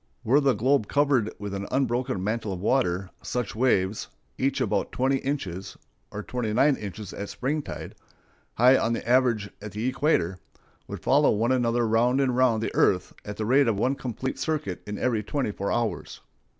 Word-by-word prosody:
Were 130 Hz, +6 st, +4 dB
the 140 Hz, -3 st, +3 dB
globe 130 Hz, -2 st, +2 dB
covered 140 Hz, -6 st, +2 dB
with 100 Hz, -1 st, -6 dB
an 100 Hz, 0 st, -4 dB
unbroken 130 Hz, -5 st, 0 dB
mantle 110 Hz, 0 st, -2 dB
of 90 Hz, -, -5 dB
water, 95 Hz, -4 st, 0 dB
such 125 Hz, -5 st, -3 dB
waves, 105 Hz, -5 st, +1 dB, 0.3 s
each 135 Hz, +1 st, 0 dB
about -, -, 0 dB
twenty 135 Hz, +2 st, +1 dB
inches 100 Hz, -10 st, -4 dB, 0.3 s
(or 105 Hz, -, -6 dB
twenty 120 Hz, -4 st, -3 dB
nine 140 Hz, +5 st, +4 dB
inches 105 Hz, -2 st, -7 dB
at 100 Hz, -, -6 dB
springtide) 145 Hz, +3 st, -4 dB, 0.6 s
high 125 Hz, +3 st, +6 dB
on 115 Hz, -, 0 dB
the 115 Hz, -, -4 dB
average 120 Hz, -5 st, +2 dB
at 105 Hz, -2 st, -8 dB
the 110 Hz, +3 st, -3 dB
equator, 130 Hz, -, +1 dB, 0.5 s
would -, -, -7 dB
follow 145 Hz, +2 st, +4 dB
one 115 Hz, +4 st, +1 dB
another 120 Hz, -2 st, +2 dB
round 120 Hz, +4 st, +2 dB
and 130 Hz, -3 st, +1 dB
round 120 Hz, -3 st, +3 dB
the -, -, -3 dB
earth 90 Hz, -2 st, +2 dB
at 105 Hz, 0 st, -7 dB
the 110 Hz, -, -2 dB
rate 135 Hz, +4 st, +4 dB
of 110 Hz, -3 st, +1 dB
one 125 Hz, +6 st, +1 dB
complete 130 Hz, 0 st, -4 dB
circuit 150 Hz, -, -2 dB
in 105 Hz, 0 st, -4 dB
every 115 Hz, -4 st, 0 dB
twenty 120 Hz, +2 st, -2 dB
four 100 Hz, 0 st, -3 dB
hours. 120 Hz, -2 st, -2 dB
120 Hz, 180 wpm, -26 LUFS, 105-130 Hz, 0.6 s, high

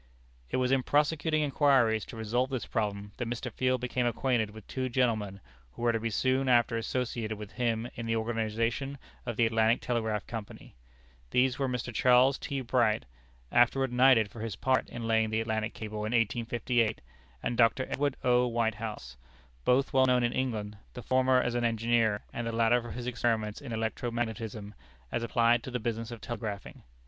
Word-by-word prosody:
It -, -, -1 dB
was 130 Hz, 0 st, +1 dB
in 135 Hz, -1 st, +3 dB
prosecuting 150 Hz, +2 st, +1 dB
inquiries 135 Hz, -7 st, +3 dB
to 115 Hz, -, -10 dB
resolve 120 Hz, +4 st, 0 dB
this 130 Hz, -3 st, -3 dB
problem, 105 Hz, -2 st, -2 dB
that 120 Hz, -, -3 dB
Mr. 120 Hz, +1 st, -4 dB
Field 130 Hz, 0 st, 0 dB
became 125 Hz, 0 st, 0 dB
acquainted 120 Hz, -2 st, 0 dB
with 110 Hz, -1 st, -12 dB
two 130 Hz, -1 st, -3 dB
gentlemen 110 Hz, -6 st, 0 dB, 0.3 s
who -, -, -8 dB
were 120 Hz, -, +4 dB
to 115 Hz, -, -1 dB
be 115 Hz, +1 st, -2 dB
soon 130 Hz, +4 st, +1 dB
after 120 Hz, -1 st, +4 dB
associated 115 Hz, -2 st, -2 dB
with 105 Hz, -1 st, -8 dB
him 120 Hz, -2 st, -1 dB
in 115 Hz, -1 st, -6 dB
the 115 Hz, -, +1 dB
organization 115 Hz, +4 st, -1 dB, 0.3 s
of 120 Hz, -, -2 dB
the 120 Hz, -, +4 dB
Atlantic 115 Hz, +1 st, +3 dB
Telegraph 110 Hz, -4 st, -1 dB
Company. 110 Hz, -3 st, -8 dB, 0.6 s
These 125 Hz, -, +2 dB
were 135 Hz, -, +1 dB
Mr. 125 Hz, -1 st, -3 dB
Charles 125 Hz, +4 st, +4 dB
T. 140 Hz, -1 st, -3 dB
Bright, 115 Hz, -, +1 dB, 0.5 s
afterward 125 Hz, +2 st, +3 dB
knighted 125 Hz, -4 st, +5 dB
for 115 Hz, -, -10 dB
his 110 Hz, -3 st, -4 dB
part 130 Hz, +4 st, +1 dB
in 115 Hz, -1 st, -5 dB
laying 110 Hz, -1 st, +2 dB
the 110 Hz, +1 st, 0 dB
Atlantic 110 Hz, -1 st, -2 dB
cable 110 Hz, -1 st, -6 dB
in 105 Hz, +2 st, -2 dB
1858, 115 Hz, 0 st, +1 dB, 0.4 s
and 120 Hz, -, -1 dB
Dr. 115 Hz, +2 st, +3 dB
Edward 145 Hz, -1 st, -1 dB
O. 125 Hz, 0 st, +4 dB
Whitehouse, 110 Hz, -, -3 dB, 0.5 s
both 135 Hz, +2 st, +2 dB
well 130 Hz, -1 st, +5 dB
known 125 Hz, -1 st, +3 dB
in 120 Hz, -, +1 dB
England, 110 Hz, -5 st, -2 dB, 0.2 s
the -, -, -7 dB
former 130 Hz, 0 st, +3 dB
as 125 Hz, -1 st, 0 dB
an 120 Hz, 0 st, 0 dB
engineer, 115 Hz, -2 st, +1 dB
and 120 Hz, -1 st, -3 dB
the -, -, -1 dB
latter 115 Hz, +1 st, +3 dB
for 120 Hz, -, -8 dB
his 120 Hz, -1 st, -6 dB
experiments 115 Hz, -3 st, -1 dB
in 140 Hz, -4 st, -8 dB
electro 110 Hz, +1 st, -2 dB
magnetism, 110 Hz, -3 st, -4 dB, 0.4 s
as -, -, -1 dB
applied 115 Hz, 0 st, +3 dB
to 130 Hz, -, -7 dB
the 125 Hz, -1 st, -2 dB
business 115 Hz, 0 st, -3 dB
of 120 Hz, -3 st, -8 dB
telegraphing. 110 Hz, -4 st, -6 dB
120 Hz, 185 wpm, -30 LUFS, 110-125 Hz, 0.6 s, knighted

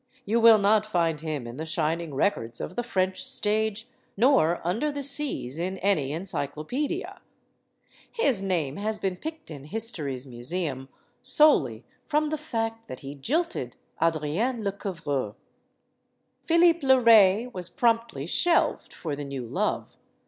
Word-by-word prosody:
You 225 Hz, +3 st, +1 dB
will 230 Hz, -1 st, +8 dB
not 210 Hz, +1 st, +3 dB
find 165 Hz, -6 st, 0 dB
him 155 Hz, -6 st, -4 dB
in 120 Hz, +2 st, -8 dB
the 155 Hz, -, -4 dB
shining 160 Hz, -1 st, -2 dB
records 120 Hz, -, -1 dB
of 185 Hz, -, -6 dB
the -, -, 0 dB
French 190 Hz, -5 st, -1 dB
stage, 220 Hz, +1 st, 0 dB, 0.3 s
nor 220 Hz, -, +4 dB
under 225 Hz, -, 0 dB
the 285 Hz, -1 st, -5 dB
"Cs" 275 Hz, -, -3 dB
in 185 Hz, +2 st, -2 dB
any 180 Hz, -9 st, +1 dB
encyclo 155 Hz, -2 st, -4 dB
pedia. 300 Hz, +8 st, -3 dB, 0.9 s
His 275 Hz, -, +1 dB
name 165 Hz, -8 st, -1 dB
has 215 Hz, +1 st, -2 dB
been 190 Hz, -3 st, -2 dB
picked 315 Hz, -, -8 dB
in 140 Hz, -2 st, -9 dB
history's 150 Hz, -, -2 dB
museum 135 Hz, +2 st, -4 dB, 0.3 s
solely 135 Hz, -, +5 dB, 0.2 s
from 300 Hz, +3 st, 0 dB
the 310 Hz, -, -2 dB
fact 225 Hz, -6 st, -4 dB
that 130 Hz, -, -8 dB
he 135 Hz, 0 st, -7 dB
jilted 315 Hz, -, -2 dB, 0.3 s
Adrienne 165 Hz, -, 0 dB
Lecouvreur. 165 Hz, -, -3 dB, 1.1 s
Philippe 335 Hz, 0 st, +5 dB
le 265 Hz, 0 st, +6 dB
Ray 220 Hz, -2 st, +6 dB
was 180 Hz, -2 st, -5 dB
promptly 230 Hz, -, 0 dB
shelved 335 Hz, -, +1 dB
for 155 Hz, -4 st, -4 dB
the 145 Hz, -, -6 dB
new 135 Hz, -3 st, -5 dB
love. 115 Hz, -, -2 dB
190 Hz, 140 wpm, -26 LUFS, 150-235 Hz, 1.1 s, will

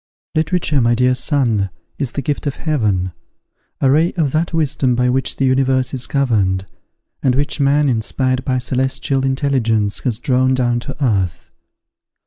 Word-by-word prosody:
"Literature, 155 Hz, -2 st, +1 dB
my 120 Hz, 0 st, +3 dB
dear 125 Hz, +1 st, +3 dB
son, 125 Hz, -6 st, +1 dB, 0.3 s
is 140 Hz, -4 st, -1 dB
the 140 Hz, -, -3 dB
gift 145 Hz, +2 st, -2 dB
of 140 Hz, -, -2 dB
Heaven, 105 Hz, -, 0 dB, 0.7 s
a 135 Hz, -, +3 dB
ray 160 Hz, +5 st, +3 dB
of 155 Hz, -6 st, 0 dB
that 160 Hz, +3 st, 0 dB
wisdom 145 Hz, -5 st, +1 dB
by 125 Hz, +1 st, +2 dB
which 130 Hz, +1 st, 0 dB
the 135 Hz, -, 0 dB
universe 130 Hz, 0 st, +1 dB
is 125 Hz, -2 st, -3 dB
governed, 100 Hz, -9 st, +1 dB, 0.6 s
and 130 Hz, -2 st, +2 dB
which 145 Hz, +2 st, -1 dB
man, 145 Hz, +1 st, +3 dB
inspired 130 Hz, +2 st, 0 dB
by 130 Hz, -, -1 dB
a -, -, +1 dB
celestial 130 Hz, +2 st, -1 dB
intelligence, 130 Hz, -6 st, 0 dB
has 120 Hz, -4 st, -2 dB
drawn 130 Hz, +1 st, +2 dB
down 120 Hz, -2 st, +1 dB
to 140 Hz, +3 st, -4 dB
earth. 95 Hz, -7 st, -1 dB
130 Hz, 160 wpm, -18 LUFS, 120-140 Hz, 0.7 s, my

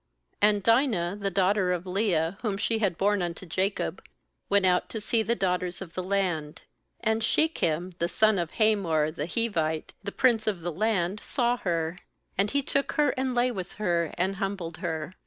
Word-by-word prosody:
O 205 Hz, -, +7 dB
A -, -, +6 dB
And 205 Hz, -2 st, -1 dB
Dinah 225 Hz, -7 st, +2 dB
the 200 Hz, -, +1 dB
daughter 190 Hz, 0 st, +2 dB
of 180 Hz, 0 st, -2 dB
Leah, 180 Hz, -4 st, +1 dB
u -, -, -15 dB
•* -, -, -24 dB
whom 210 Hz, -5 st, -1 dB
she 220 Hz, +2 st, 0 dB
had 195 Hz, -6 st, 0 dB
borne 205 Hz, 0 st, +2 dB
unto 175 Hz, +1 st, -4 dB
Jacob, 185 Hz, -, -2 dB, 0.5 s
went 200 Hz, -1 st, +3 dB
out 180 Hz, -1 st, +2 dB
to 220 Hz, -, -4 dB
see 225 Hz, +2 st, +1 dB
the 230 Hz, +2 st, 0 dB
daughters 180 Hz, -3 st, -1 dB
of 175 Hz, -4 st, -9 dB
the 185 Hz, -, -2 dB
land. 180 Hz, -5 st, -1 dB, 0.4 s
2And 220 Hz, +1 st, +2 dB
Shechem 185 Hz, -, +1 dB
the 170 Hz, -, +1 dB
son 215 Hz, +2 st, +3 dB
of 170 Hz, -2 st, -2 dB
Hamor 180 Hz, -9 st, +2 dB
the 155 Hz, -1 st, -4 dB
Hivite, 165 Hz, -8 st, -1 dB
the 200 Hz, -, -4 dB
prince 230 Hz, -3 st, +2 dB
of 195 Hz, -5 st, 0 dB
the 175 Hz, +1 st, -3 dB
land, 200 Hz, 0 st, 0 dB
saw 245 Hz, -2 st, +1 dB
her; 170 Hz, -3 st, -2 dB, 0.4 s
and 200 Hz, +2 st, +2 dB
he 280 Hz, +4 st, +1 dB
took 280 Hz, -1 st, 0 dB
her, 300 Hz, -1 st, +3 dB
and.lay 255 Hz, -2 st, +1 dB
with 190 Hz, -5 st, -6 dB
her, 170 Hz, -5 st, 0 dB
and 190 Hz, +2 st, 0 dB
humbled 195 Hz, -5 st, -3 dB
her. 160 Hz, -1 st, -4 dB
195 Hz, 195 wpm, -27 LUFS, 175-220 Hz, 0.5 s, O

